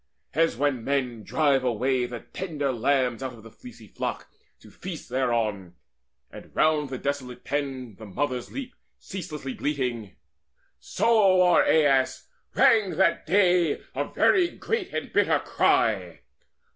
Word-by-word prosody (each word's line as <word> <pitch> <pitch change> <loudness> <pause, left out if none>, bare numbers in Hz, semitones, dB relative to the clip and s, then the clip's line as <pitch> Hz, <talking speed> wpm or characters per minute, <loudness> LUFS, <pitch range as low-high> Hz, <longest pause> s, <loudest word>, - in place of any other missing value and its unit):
As 165 +2 +1
when 140 -5 0
men 130 -4 -1
drive 140 +4 +1
away 125 +1 0
the 120 -1 -7
tender 155 -7 -3
lambs 125 0 +1
Out 130 -1 -4
of 110 -3 -14
the 115 - -13
fleecy 250 -1 -13
flock, - - -5 0.3
to - - -17
feast 180 -4 -8
thereon, 115 -8 -1 0.6
And - - -12
round 155 -2 +2
the 130 - -4
desolate 130 -3 -4
pens 135 -6 -4
the 110 - -9
mothers 125 +4 -3
leap 265 -2 -6 0.2
Ceaselessly 155 -8 -6
bleating, 125 -8 -3 0.6
so 200 -5 +3
o'er 180 -1 +5
Aias 135 -4 +2 0.3
rang 200 -7 +4
That 190 -3 +2
day 180 -5 +3
a - - -1
very 365 -2 +3
great 420 0 -3
and - - -5
bitter - - +3
cry. - - +1
140 Hz, 135 wpm, -26 LUFS, 125-170 Hz, 0.6 s, o'er